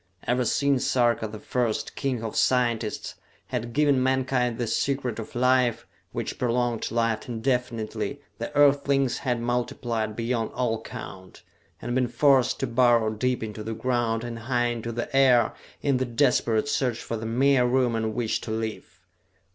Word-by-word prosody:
Ever 125 +1 +1
since 140 +2 +2
Sarka 120 -3 +2
the 110 +1 -8
First, 115 +1 -2
king 130 -5 -2
of 110 - -4
scientists, 120 -4 +1 0.4
had 120 -1 -3
given 145 0 +3
mankind 130 -2 +1
the 120 - -1
Secret 125 0 -1
of 110 - -8
Life, 125 -1 +2 0.3
which - - -4
prolonged 120 -1 0
life 115 0 -1
indefinitely, 120 -2 -2 0.2
the - - -4
Earthlings 140 -2 +3
had 125 -3 -1
multiplied 120 -2 -2
beyond 115 -1 -2
all 115 -3 -1
count, 95 -4 -10 0.4
and 120 - -4
been 125 0 +2
forced 135 +1 +3
to - - +1
burrow 120 -2 +3
deep 125 +3 -1
into 105 -1 -6
the 110 0 -4
ground 115 -1 0
and 120 -1 -5
high 120 0 0
into 115 -1 -4
the 120 +3 -4
air 125 -4 +5 0.3
in 140 -3 +2
the 130 - 0
desperate 120 -1 +2
search 125 -5 0
for 115 - -5
the 110 0 -4
mere 125 +2 +3
room 125 -2 +2
in 110 -1 -2
which 120 -3 -1
to - - -7
live. 110 0 -5
120 Hz, 160 wpm, -26 LUFS, 115-130 Hz, 0.4 s, air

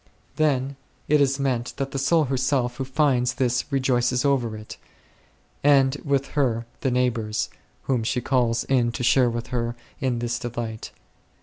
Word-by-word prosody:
Then 140 -3 +1 0.3
it 150 0 +4
is 135 0 +2
meant 125 -3 -1
that 135 0 -3
the 135 - -2
soul 160 +4 +3
herself 130 -2 0
who 135 - -2
finds 130 -3 +1
this 125 +2 0
rejoices 125 -1 +1
over 120 -6 +1
it, 110 0 -10 0.9
and 135 -1 +5
with 140 -1 0
her 120 -5 0
the 135 - 0
neigh 125 0 +2
bours, 110 -2 -3 0.3
whom 125 -4 0
she 125 +3 0
calls 120 -2 +1
in 125 -3 +2
to 125 - -4
share 125 0 +4
with 115 0 -4
her 120 -1 -1 0.2
in 130 -3 0
this 120 0 -2
delight. 115 -2 -5
125 Hz, 165 wpm, -24 LUFS, 120-135 Hz, 0.9 s, and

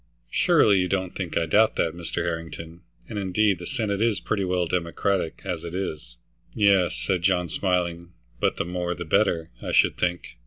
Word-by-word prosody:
"Surely 100 -2 +4
you 90 - +1
don't 95 -1 -2
think 90 -4 -3
I 85 - +2
doubt 105 +7 +3
that, 80 - 0
Mr. 85 0 -4
Harrington? 85 0 -5 0.3
And 105 -3 -4
indeed 100 0 +1
the 90 - -7
Senate 110 -6 -2
is 115 -4 +2
pretty 100 -2 -1
well 90 -1 0
Democratic 85 +1 -1
as 90 -4 -3
it 85 0 -6
is." 75 -10 -5 0.4
"Yes," 100 -4 +3
said 95 -3 -1
John, 90 -1 +1
smiling, 85 -2 -1 0.3
"but - - +1
the - - -1
more 90 0 -2
the 85 - -6
better, 80 +1 +1
I - - -4
should - - +3
think. 90 -8 -2
90 Hz, 185 wpm, -25 LUFS, 85-95 Hz, 0.4 s, Surely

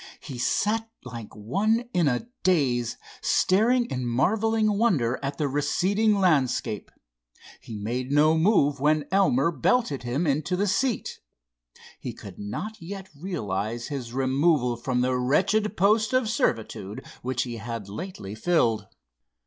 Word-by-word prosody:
He 130 -5 -8
sat 220 - 0
like 115 -3 -9
one 210 - 0
in 175 -4 +3
a 130 - 0
daze, 125 -10 +1 0.2
staring 235 +6 +3
in 125 - -3
marvelling 215 - +1
wonder 135 - +2
at 140 0 -3
the 150 - 0
receding 190 +10 +1
landscape. 135 - +1 0.7
He 110 - -9
made 125 +5 -3
no 150 +2 +5
move 160 -5 +3
when 150 +1 +2
Elmer 170 -6 +3
belted 200 - +1
him 125 +7 -1
into 150 +4 0
the 200 +3 +1
seat. 230 +4 -1 0.8
He - - -5
could 95 -3 -11
not 200 - -5
yet 190 +2 -7
realize 120 - -3
his 130 -5 -5
removal 135 0 +2
from 125 +1 -1
the 130 0 +1
wretched 195 +12 +1
post 215 +5 +3
of 255 -3 +2
servitude 110 - -2 0.2
which 130 0 -1
he 120 -2 -6
had 115 -2 -6
lately 105 - -7
filled. 110 - +1
145 Hz, 135 wpm, -26 LUFS, 120-195 Hz, 0.8 s, no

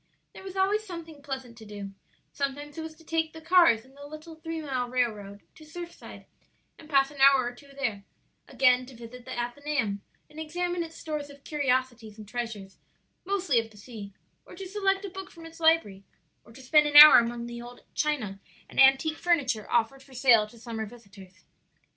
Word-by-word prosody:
There - - -11
was 380 -1 -9
always 395 +3 +1
something 335 -6 -9
pleasant 265 -4 -6
to 220 - -12
do; 205 -1 -8 0.4
sometimes 285 +1 -4
it 325 - -5
was 320 0 -8
to 325 - -19
take 320 0 -1
the 320 - -9
cars 325 -9 +4
on 265 - -21
the 285 +1 -11
little 310 +2 -10
three 325 0 -6
mile 260 -5 -3
railroad 210 -5 -2
to 315 - -16
Surfside 340 +2 -10 0.5
and 315 - -14
pass 275 -1 +3
an 285 -2 -8
hour 275 -1 +7
or 245 - -4
two 280 +4 -17
there; 220 -7 -2 0.4
again 255 -1 +3
to 260 - -13
visit 235 +1 -11
the - - -7
Athenaeum 240 -4 -2 0.3
and 305 - -13
examine 350 +3 -2
its 330 -1 -6
stores 300 -2 -5
of 280 0 -15
curiosities 255 -6 -1
and 215 -1 -11
treasures, 210 -4 -6 0.5
mostly 370 -10 +1
of 225 0 -5
the 215 - -19
sea; 205 -2 -10 0.3
or - - -14
to 390 - -7
select 390 0 0
a - - -5
book 385 +1 -8
from 330 -1 -13
its 330 0 -12
library; 320 -13 +2 0.4
or - - -18
to 265 +3 -14
spend 300 +3 +4
an 295 - -4
hour 300 -2 +12
among 235 0 -3
the 235 0 -7
old 240 0 -12
china 245 -11 -2 0.3
and - - -6
antique 270 +4 +5
furniture 275 -11 0
offered 240 +3 0
for 270 -1 -17
sale 235 -4 +5
to 235 - -17
summer 225 -2 -6
visitors. 195 -6 -16
270 Hz, 195 wpm, -27 LUFS, 235-320 Hz, 0.5 s, hour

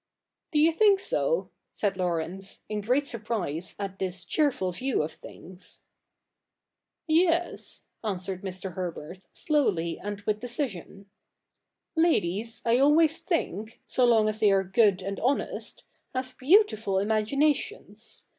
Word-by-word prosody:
' - - -60
Do - - +2
you 315 +2 +5
think 400 +3 +4
so? - - 0
' - - -54
said 200 -2 -1
Laurence, 180 +1 -3
in 210 0 -3
great 250 +7 +1
surprise 210 - -4
at 195 -1 -5
this 185 -2 -4
cheerful 275 - +1
view 250 - -1
of 155 - -4
things. 180 +2 -12 1.2
'Yes," 340 +1 +1 0.2
answered 190 -3 -2
Mr. 190 -1 -5
Herbert, 175 0 -6
slowly 195 - 0
and 205 0 -5
with 210 +1 -1
decision. 235 - -5 0.4
' - - -56
Ladies 220 - -1
I 235 +1 +4
always 305 +3 +4
think, 220 - -2
so 255 - +1
long 225 -3 +5
as 215 0 -2
they 215 -2 +5
are 195 0 +3
good 190 -1 +3
and 195 0 -4
honest, 265 +4 -1 0.3
have 255 0 -3
beautiful 260 - +3
imaginations. 275 - 0
215 Hz, 135 wpm, -27 LUFS, 190-280 Hz, 1.2 s, you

